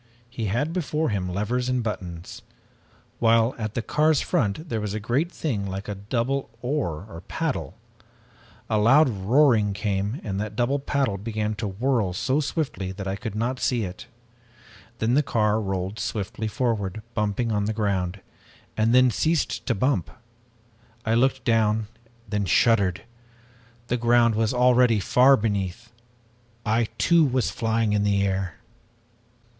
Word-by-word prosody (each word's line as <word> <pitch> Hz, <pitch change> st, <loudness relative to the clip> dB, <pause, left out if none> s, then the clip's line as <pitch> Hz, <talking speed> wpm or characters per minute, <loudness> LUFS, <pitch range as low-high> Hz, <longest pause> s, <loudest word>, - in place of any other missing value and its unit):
He 115 Hz, -3 st, -4 dB
had 125 Hz, +11 st, -1 dB
before 160 Hz, -3 st, -1 dB
him 95 Hz, -4 st, -2 dB
levers 120 Hz, +7 st, -1 dB
and 125 Hz, -1 st, 0 dB
buttons, 90 Hz, -6 st, -6 dB, 0.8 s
while 115 Hz, +1 st, +4 dB
at 110 Hz, -1 st, -4 dB
the 120 Hz, -, -1 dB
car's 155 Hz, +2 st, +2 dB
front 115 Hz, -, -1 dB
was 105 Hz, -5 st, -3 dB
a -, -, -2 dB
great 130 Hz, -, 0 dB
thing 110 Hz, -, -2 dB
like 95 Hz, +1 st, -5 dB
a 105 Hz, -, -3 dB
double 115 Hz, +6 st, -2 dB
oar 110 Hz, -, -2 dB
or 85 Hz, -5 st, -10 dB
paddle. -, -, -3 dB, 0.9 s
A 110 Hz, -, +1 dB
loud 135 Hz, +9 st, +6 dB
roaring 110 Hz, 0 st, +3 dB
came 100 Hz, +4 st, -2 dB
and 100 Hz, -1 st, -3 dB
that 105 Hz, 0 st, -5 dB
double 125 Hz, +5 st, +1 dB
blade 135 Hz, -8 st, -1 dB
began 110 Hz, -1 st, -2 dB
to 105 Hz, 0 st, -4 dB
whirl 110 Hz, -1 st, 0 dB
so 130 Hz, +10 st, 0 dB
swiftly 135 Hz, -, -2 dB
that 95 Hz, +1 st, -6 dB
I 95 Hz, -, -1 dB
could 105 Hz, +1 st, -6 dB
not 120 Hz, +4 st, -1 dB
see 120 Hz, -3 st, 0 dB
it. 90 Hz, -1 st, -7 dB, 0.9 s
Then 115 Hz, +1 st, +1 dB
the 145 Hz, -, +5 dB
car 110 Hz, -5 st, +1 dB
rolled 95 Hz, +1 st, -3 dB
swiftly 110 Hz, +1 st, -3 dB
forward, 110 Hz, -3 st, -2 dB
bumping 105 Hz, +2 st, -1 dB
on 105 Hz, -1 st, 0 dB
the 110 Hz, -, 0 dB
ground, 100 Hz, -3 st, -1 dB, 0.5 s
and 110 Hz, +2 st, +2 dB
then 130 Hz, -1 st, +6 dB
ceased 160 Hz, +4 st, 0 dB
to -, -, +1 dB
bump. 100 Hz, -, 0 dB, 1.0 s
I 110 Hz, -, +1 dB
looked 130 Hz, +2 st, +2 dB
down, 110 Hz, -1 st, +2 dB, 0.4 s
then 105 Hz, -1 st, -1 dB
shuddered. 95 Hz, 0 st, +3 dB, 0.8 s
The 125 Hz, +1 st, -1 dB
ground 120 Hz, 0 st, +4 dB
was 110 Hz, 0 st, +1 dB
already 125 Hz, -2 st, +4 dB
far 130 Hz, +7 st, +5 dB
beneath! 100 Hz, -4 st, -3 dB, 0.7 s
I 115 Hz, +2 st, +2 dB
too, 170 Hz, -1 st, +4 dB
was 130 Hz, -3 st, +1 dB
flying 115 Hz, -1 st, 0 dB
in 105 Hz, -, +2 dB
the 100 Hz, -1 st, +2 dB
air! 95 Hz, -2 st, -2 dB
110 Hz, 150 wpm, -25 LUFS, 100-125 Hz, 1.0 s, loud